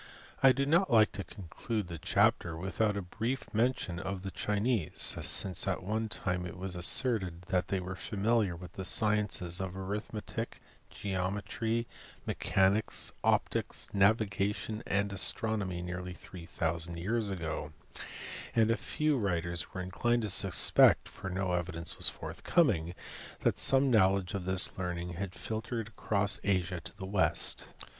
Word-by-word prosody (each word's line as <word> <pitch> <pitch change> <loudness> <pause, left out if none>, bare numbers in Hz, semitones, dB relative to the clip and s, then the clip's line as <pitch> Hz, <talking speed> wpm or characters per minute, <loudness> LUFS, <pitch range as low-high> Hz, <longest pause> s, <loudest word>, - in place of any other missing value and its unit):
I 135 - +7
do 140 +2 0
not 170 +6 +3
like 110 -3 +5
to 100 - -6
conclude 105 +4 -5
the 85 -2 -7
chapter 85 +2 +1
without 100 +4 -1
a 100 - -3
brief 115 +8 -3
J - - -14
mention 110 -6 0
of 95 +1 -5
the 95 - -5
Chinese, 105 -3 -1 0.2
since 95 -1 +3
at 95 -1 -1
one 110 +3 -2
time 90 -3 -2
it 90 - -9
was 95 -1 -3
asserted 90 -2 +2
that 90 -3 +1
I - - -33
they 95 - -1
were 95 +1 -6
familiar 105 0 0
with 90 +1 -11
the 95 - -6
sciences 105 -3 +2
of 95 0 -5
arithmetic, 105 +3 -5 0.3
geometry, 100 +4 -3 0.2
* - - -20
mechanics, 100 +3 +1
optics, - - 0
navigation, 105 +1 +1
and 100 0 0
astronomy 95 -2 +1
nearly 90 0 -6
three 85 0 -11
thousand 85 0 -1
years 105 +5 -1
ago, 80 -5 -4 0.8
and 115 -1 +4
a 115 - +1
few 150 +2 0
writers 85 -4 -2
were 95 - -5
inclined 120 +6 0
to 105 - 0
suspect 95 -1 +5
(for 95 - -8
no 95 0 -2
evidence 85 -1 -4
was - - +3
forthcoming) 85 - 0 0.5
that - - +1
some 135 0 +4
knowledge 95 -4 +3
of 95 -2 -4
this 95 +1 +5
learning 90 -1 -3
had 90 +1 -5
filtered 110 0 -4
across 100 -2 +1
Asia 90 -3 0
to - - -8
the 95 - -6
West. 95 0 +1
95 Hz, 150 wpm, -31 LUFS, 90-110 Hz, 0.8 s, I